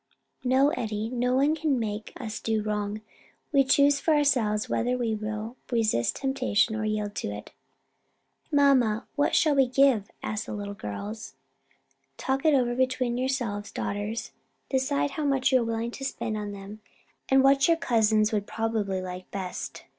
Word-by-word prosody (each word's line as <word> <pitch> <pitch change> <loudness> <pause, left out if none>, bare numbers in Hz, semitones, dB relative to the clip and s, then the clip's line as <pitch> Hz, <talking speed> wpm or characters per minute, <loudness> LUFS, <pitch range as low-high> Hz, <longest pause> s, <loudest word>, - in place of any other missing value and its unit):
"No, 265 +3 +4
Eddie, 220 -7 -3
no 250 0 +1
one 280 +4 +3
can 300 -5 0
make 215 -1 -4
us 220 -4 -5
do 220 -1 -1
wrong; 210 0 -2 0.5
we 280 -2 +5
choose 280 +1 +4
for 315 - +2
ourselves 245 -8 +2
whether 245 +2 0
we 235 -3 -1
will 215 +3 -4
resist 220 - +1
temptation 255 -5 +1
or 220 - -2
yield 210 -1 -2
to - - -2
it." 105 0 -8 1.0
"Mamma, 265 -7 +3
what 290 0 +2
shall 310 -2 +4
we 270 -2 +4
give," 255 -5 +3
asked 210 -1 -3
the - - -5
little 205 -1 -5
girls. 200 - -7 0.8
"Talk 270 +3 -1
it 310 -2 +5
over 245 -2 +2
between 255 -1 0
yourselves, 245 -6 -2
daughters, 205 +3 -3 0.4
decide 280 +1 +1
how 305 - -3
much 270 -2 +2
you 260 -1 +4
are - - -1
willing 230 +1 -2
to 270 - -8
spend 225 -4 -3
on 210 -1 -4
them, 200 +1 -9 0.5
and 265 0 +5
what 275 0 +5
your 335 -1 +4
cousins 220 -6 +2
would 205 -2 -1
probably 215 -4 -1
like 185 0 -7
best. 190 -2 -6
230 Hz, 165 wpm, -27 LUFS, 210-270 Hz, 1.0 s, we